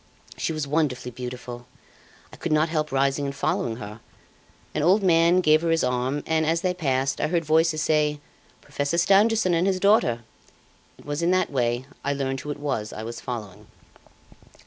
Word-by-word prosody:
She - - -2
was 155 -2 -2
wonderfully 140 -5 -1
beautiful. 125 0 -7 0.7
I - - -9
could - - -4
not 155 +1 +3
help 155 -1 -1
rising 135 +1 +1
and 140 0 -4
following 120 -4 -1
her. 105 -2 -9 0.7
An - - -1
old 190 +6 +4
man 170 0 +4
gave 155 -2 +4
her 165 - -1
his 165 0 +2
arm 125 +3 -1
and, 160 0 +1
as 165 +2 +1
they 185 -1 0
passed, 135 -6 -1
I - - +1
heard 165 0 0
voices 155 0 +2
say: 150 -1 +1 0.4
'Professor 145 +4 -2
Stangerson 200 +2 +4
and 170 +3 +2
his 190 -1 +1
daughter.' 185 - +3 0.7
It - - -18
was 145 +2 -3
in 170 - +2
that 185 -3 +1
way 120 -1 0 0.2
I 140 - 0
learned 135 -1 -2
who 150 - -8
it 145 - -3
was 135 -7 -3
I 110 - -7
was 115 +1 -7
following. 110 -6 -7
150 Hz, 185 wpm, -24 LUFS, 130-165 Hz, 0.7 s, old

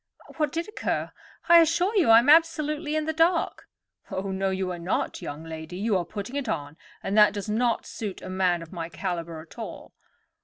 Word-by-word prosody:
What 305 -2 +1
did 335 +3 -3
occur? 425 - -3 0.4
I 340 0 +9
assure 345 +6 +2
you 360 - +4
I 225 - +9
am 240 +3 +4
absolutely 305 -1 +3
in 310 -1 0
the 315 - -1
dark." 330 +2 +1 0.4
"Oh, 195 +1 -3
no, 190 0 0
you 190 -1 -2
are 175 - -5
not, 170 +2 -2
young 145 +2 -6
lady. 160 +2 -7
You 210 +1 0
are 180 -2 0
putting 210 +7 -6
it 285 -2 -2
on, 145 +1 -3 0.3
and 195 - -2
that 210 - +7
does 205 -1 -5
not 235 +1 +1
suit 205 -4 -6
a - - -7
man 185 -2 +1
of 165 - -13
my 165 -2 -5
caliber 170 -3 -4
at 160 - -15
all. - - -8
205 Hz, 205 wpm, -26 LUFS, -, 0.4 s, I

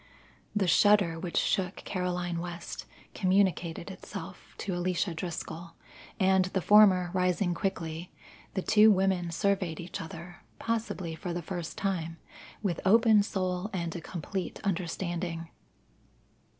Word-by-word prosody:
The 205 -2 +2
shudder 190 -3 +4
which 175 0 -3
shook 190 -2 +1
Caroline 180 -2 -2
West 170 0 -6 0.3
communicated 185 -2 +1
itself 190 - -9
to 195 - -3
Alicia 175 0 0
Driscoll, 170 0 -6 0.4
and 190 -1 +4
the 190 0 -1
former 190 -4 +6
rising 180 0 +1
quickly, 170 -2 -3 0.4
the 190 - -1
two 215 +1 +6
women 190 -3 +2
surveyed 185 -2 0
each 175 +1 -5
other, 170 +2 -8 0.2
possibly 220 -7 -2
for 175 +2 -5
the 175 0 -3
first 175 -1 -5
time, 165 -4 -2 0.5
with 180 -5 0
open 220 +1 +6
soul 185 -1 -2
and 170 -2 -3
a 170 - -4
complete 180 +3 -5
understanding. 170 -2 -2
180 Hz, 125 wpm, -29 LUFS, 170-195 Hz, 0.5 s, former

